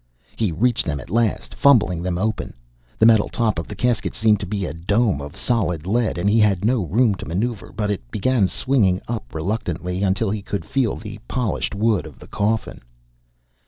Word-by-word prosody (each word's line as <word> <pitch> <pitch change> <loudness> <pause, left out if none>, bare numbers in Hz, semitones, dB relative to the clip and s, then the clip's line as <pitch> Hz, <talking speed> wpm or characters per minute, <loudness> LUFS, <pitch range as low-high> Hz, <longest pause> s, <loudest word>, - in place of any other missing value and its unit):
He 110 -5 0
reached 120 +8 +1
them 75 -2 -1
at - - -11
last, 115 -1 0
fumbling 105 -11 +4
them 90 -1 -2
open. 110 +4 -2 0.4
The 110 - +4
metal 110 -2 +5
top 110 -7 0
of 85 - -5
the - - -7
casket 125 -2 0
seemed 110 -2 +3
to - - -5
be 100 -1 -2
a 75 - -4
dome 95 - +1
of 70 0 -8
solid 90 -10 0
lead, 110 -1 0
and 90 +3 0
he 110 +3 +4
had 105 -3 +3
no 120 -2 +2
room 110 - +3
to 95 - -8
maneuver, 105 +6 -3
but 105 0 -2
it 75 -12 -5
began 110 - +2
swinging 105 -7 +1
up 115 -7 -5
reluctantly, 90 0 -2
until 95 +2 +1
he 105 0 -2
could 100 -4 -4
feel 130 -5 0
the 105 0 -8
polished 120 -4 -2
wood 105 -4 +1
of 75 - -13
the - - -13
coffin. 110 +2 -2
105 Hz, 195 wpm, -22 LUFS, 90-115 Hz, 0.4 s, metal